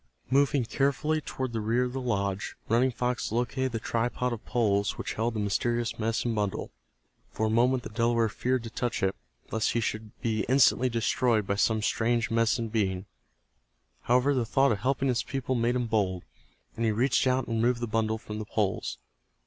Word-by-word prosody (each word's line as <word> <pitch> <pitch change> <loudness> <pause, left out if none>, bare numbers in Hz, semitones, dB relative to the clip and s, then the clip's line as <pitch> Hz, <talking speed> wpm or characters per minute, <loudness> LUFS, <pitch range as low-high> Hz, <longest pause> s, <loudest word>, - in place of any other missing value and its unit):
Moving 140 -1 +3
carefully 145 +5 0
toward 130 -4 -4
the 110 - -1
rear 115 +4 +1
of 125 0 -3
the 135 - -3
lodge, 100 -5 -2
Running 120 +4 +3
Fox 125 -2 -2
located 125 +3 -1
the 115 - -2
tripod 120 +2 -1
of 115 - -7
poles 100 -4 +1
which - - -4
held 115 +1 -1
the - - -1
mysterious 120 +4 -1
medicine 115 +1 0
bundle. 105 -3 -2 0.6
For 110 - -2
a 110 - 0
moment 125 +2 +3
the - - -6
Delaware 115 0 +2
feared 125 +4 -1
to 115 - -7
touch 120 -2 -2
it, 95 0 +1 0.4
lest 110 -1 +1
he 120 - +1
should 110 -1 -4
be 110 -3 0
instantly 130 -1 +4
destroyed 115 -1 +1
by 100 - 0
some 110 +2 +1
strange 115 0 +1
Medicine 115 0 +1
Being. 95 -4 -1 1.0
However, 125 +4 +3
the 130 -3 +1
thought 135 +4 +3
of 105 - 0
helping 135 +1 0
his 125 -2 +1
people 130 0 -3
made 120 0 +1
him 125 -1 0
bold, 100 -5 0 0.5
and 115 - -2
he 110 - +3
reached 125 +5 +2
out 130 0 +2
and 115 - -1
removed 120 +1 +2
the 120 - -1
bundle 110 0 0
from 105 -1 -7
the 110 - -4
poles. 105 -2 -1
115 Hz, 190 wpm, -28 LUFS, 110-125 Hz, 1.0 s, instantly